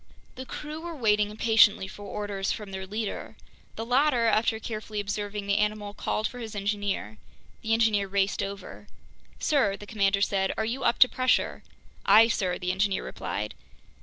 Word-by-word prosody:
The 260 0 -8
crew 305 +1 -6
were 340 -1 -6
waiting 210 -5 +2
impatiently 215 -2 +4
for 205 - -11
orders 200 -1 -3
from 210 -3 -5
their 190 0 -6
leader. 215 +2 -4 0.4
The 225 - -4
latter, 250 0 +3
after 225 0 +2
carefully 215 -1 -5
observing 205 0 -3
the 200 +1 +1
animal, 210 -1 -1
called 215 +1 -1
for 250 - -9
his 220 -3 -7
engineer. 200 - -2 0.4
The 225 0 0
engineer 220 -3 +2
raced 195 0 0
over. 200 +1 -7 0.5
"Sir," 235 -10 +1
the 205 - -10
commander 200 -2 +1
said, 195 -1 +1
"are 220 - 0
you 250 +4 -3
up 235 - +2
to 255 - +10
pressure?" 255 0 +1 0.4
"Aye, 225 +2 +7
sir," 185 -5 0
the 180 0 -1
engineer 195 +1 0
replied. 105 +2 -4
210 Hz, 165 wpm, -27 LUFS, 200-225 Hz, 0.5 s, to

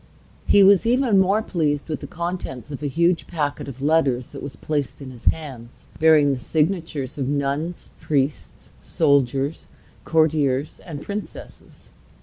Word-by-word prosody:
He 200 - +6
was 200 +2 +5
even 240 -4 +3
more 195 +3 +2
pleased 150 -7 -1
with 155 -2 -3
the - - -8
contents 170 -6 -5
of 140 - -6
a 150 - -1
huge 170 +4 +1
packet 145 -5 -3
of 135 0 -8
letters 140 -5 +2
that - - -9
was 140 -1 -7
placed 145 -3 -3
in 135 -2 -8
his 120 -2 -14
hands, 130 -7 -3
bearing 155 -3 +5
the 130 - -4
signatures 155 -3 -2
of 135 - -1
nuns, 145 +4 -2
priests, 135 - -2
soldiers, 140 -1 +1 0.4
courtiers, 150 -3 +1
and 150 -4 -7
princesses. 205 +1 -9
150 Hz, 145 wpm, -22 LUFS, 140-170 Hz, 0.4 s, He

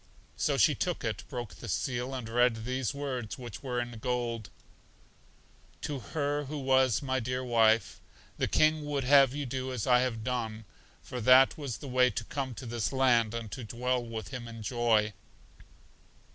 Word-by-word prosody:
So - - 0
she - - +5
took - - -2
it, - - -3
broke 120 -6 -5
the 90 +6 -10
seal, 125 +6 -2
and 125 -3 -5
read 115 -1 +2
these 130 -1 -1
words, 130 -6 -4
which 120 -4 -8
were 125 -3 -2
in 120 -2 -5
gold: 120 -2 -2 1.3
"To 145 -2 -3
her 145 +2 -2
who 150 +3 -5
was 130 -2 +3
my 130 -1 0
dear 125 +2 -2
wife. 115 -2 +3 0.4
The - - +1
King 155 0 +3
would 145 -2 -1
have 135 0 +6
you 145 -1 -3
do 130 +1 -3
as 125 -5 -3
I 125 -1 +5
have 120 -3 -1
done, 110 -3 -3 0.4
for 125 - -6
that 130 +3 +6
was 140 -7 -5
the 140 - -9
way 125 0 +4
to 115 0 -4
come 130 +1 -4
to 130 - -8
this 115 -2 -2
land, 120 -4 +3
and 115 -3 -5
to 130 - -6
dwell 125 +2 -1
with 110 -4 -6
Him 120 -2 -6
in 115 -1 -8
joy." 110 -2 +2
125 Hz, 180 wpm, -30 LUFS, 115-130 Hz, 1.3 s, have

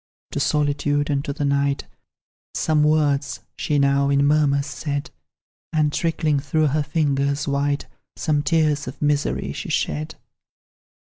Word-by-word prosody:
To - - -2
solitude 145 0 +1
and 140 -1 0
to - - -2
the 145 +1 -2
night, 140 0 +1 0.7
Some 155 -1 +2
words 145 -2 +1
she 150 - 0
now, 140 0 +3
in 140 0 +3
murmurs, 145 -1 +3
said; 145 +1 -4 0.6
And 155 -2 +1
trickling 160 -3 +1
through 150 +2 +1
her 150 +3 +1
fingers 140 -2 0
white, 140 0 0 0.3
Some 150 -3 0
tears 150 0 +1
of 125 - -7
misery 145 -1 0
she - - -6
shed. 75 0 -1
145 Hz, 135 wpm, -22 LUFS, 140-150 Hz, 0.7 s, now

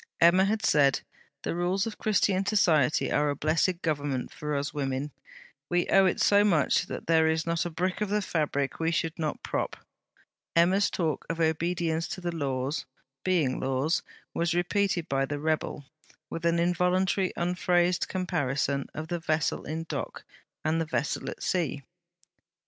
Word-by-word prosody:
Emma 175 +3 +6
had 220 +2 0
said: 140 -6 +4 0.4
'The - - -2
rules 180 +3 0
of 225 - -6
Christian 200 -2 +2
Society 165 - +2
are 150 0 +2
a 145 - -1
blessed 165 +5 0
Government 145 -5 -2
for 150 0 -3
us 140 +1 -2
women. 140 0 -2 0.6
We 175 0 +1
owe 195 -1 +6
it 185 - 0
so 205 0 +5
much 170 -9 +2
that - - -6
there 160 -1 +4
is 160 0 +1
not 170 +1 0
a - - -4
brick 180 +4 -2
of 210 - 0
the 210 0 +1
fabric 145 -5 -1
we 165 0 +1
should 165 0 -1
not 155 -2 -3
prop.' - - -2 0.8
Emma's 185 +4 +4
talk 160 -4 -1
of 165 0 -3
obedience 165 0 0
to - - -5
the 175 -1 -3
Laws, 135 -1 -2 0.4
being 165 -9 +1
Laws, 135 +5 0 0.3
was 170 0 0
repeated 175 -1 0
by 135 -1 0
the 145 - -3
rebel, 155 -1 -2 0.5
with 165 0 -4
an 170 0 +2
involuntary 180 +2 +1
unphrased 175 0 +1
comparison 140 -7 -1
of 155 +1 -5
the 175 +1 -2
vessel 155 -1 -1
in 160 +2 -3
dock 165 - -5 0.4
and 160 +1 +1
the - - -1
vessel 150 -1 -2
at - - -7
sea. 155 -6 -1
165 Hz, 165 wpm, -28 LUFS, 150-180 Hz, 0.8 s, Emma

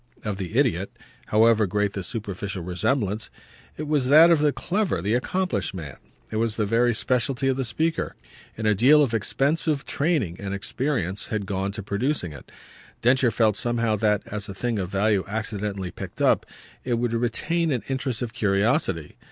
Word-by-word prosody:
of 105 -2 -2
the 95 +4 -4
idiot, 105 -9 +1 0.3
however 110 -1 +4
great 105 +2 0
the 100 - -4
superficial 100 -4 -5
resemblance: 100 +4 -1 0.5
it 155 - -4
was 145 -4 +1
that 155 +5 +8
of 165 - +5
the 150 0 +3
clever, 190 - -1
the 100 +6 -1
accomplished 185 - -1
man; 75 -7 -7 0.3
it 110 - -2
was 115 -1 0
the 105 - 0
very 115 +3 +3
specialty 125 +3 0
of 135 - +2
the 135 - -1
speaker, 160 +7 -1 0.4
and 110 - -3
a 105 - +4
deal 140 +9 +6
of 125 -5 -1
expensive 140 +6 0
training 140 - 0
and 100 -1 -4
experience 100 - -2
had 105 -2 -2
gone 95 0 -2
to 105 0 -5
producing 100 - -1
it. 70 - -13 0.5
Densher 125 +1 +4
felt 110 -1 +2
somehow 115 -1 0
that, 105 -1 +1
as 105 0 -5
a 95 - -6
thing 115 +1 -1
of 95 -2 -3
value 100 0 +2
accidentally 100 -3 -3
picked - - -8
up, - - +3 0.4
it 125 -2 0
would 120 0 -1
retain 150 +8 0
an 125 -6 -1
interest 130 -3 -2
of 115 - -5
curiosity. 100 - 0
110 Hz, 175 wpm, -25 LUFS, 100-130 Hz, 0.5 s, that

